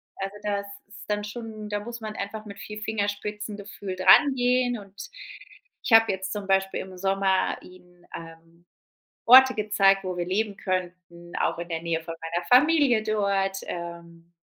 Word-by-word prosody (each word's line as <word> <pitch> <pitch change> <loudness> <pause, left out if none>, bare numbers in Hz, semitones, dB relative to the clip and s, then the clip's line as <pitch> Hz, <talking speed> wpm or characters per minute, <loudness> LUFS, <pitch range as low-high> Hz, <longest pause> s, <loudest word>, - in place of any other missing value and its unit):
also, 195 +1 -5
das 200 -1 -2 0.2
ist 205 - -13
dann 210 0 -1
schon 215 -1 -7
da 205 0 -2
muss 235 +2 -7
man 215 -1 -6
einfach 215 +2 -6
mit 200 -1 -10
viel 210 0 -8
Fingerspitzengefühl 205 -2 -4
dran 190 +10 +6
gehen 245 -1 +1
und 200 -1 -14 0.9
ich - - -4
habe 225 0 +7
jetzt 190 0 -4
zum 205 -2 -5
Beispiel 195 0 +1
im 190 -1 -10
Sommer 195 0 +1
ihnen, 180 -1 -18
ähm, 165 +1 -13 0.6
Orte 260 +2 +8
gezeigt, 200 -2 +3
wo 185 -1 -4
wir 175 -1 -2
leben 205 +2 -1
könnten, 180 -2 -5
auch - - 0
in 170 +1 -6
der 165 -1 -4
Nähe 165 -1 -2
von 165 - -6
meiner 170 +2 -3
Familie 270 -3 +5
dort, 200 -2 0
ähm, 170 -1 -8
195 Hz, 160 wpm, -25 LUFS, 180-215 Hz, 0.9 s, Orte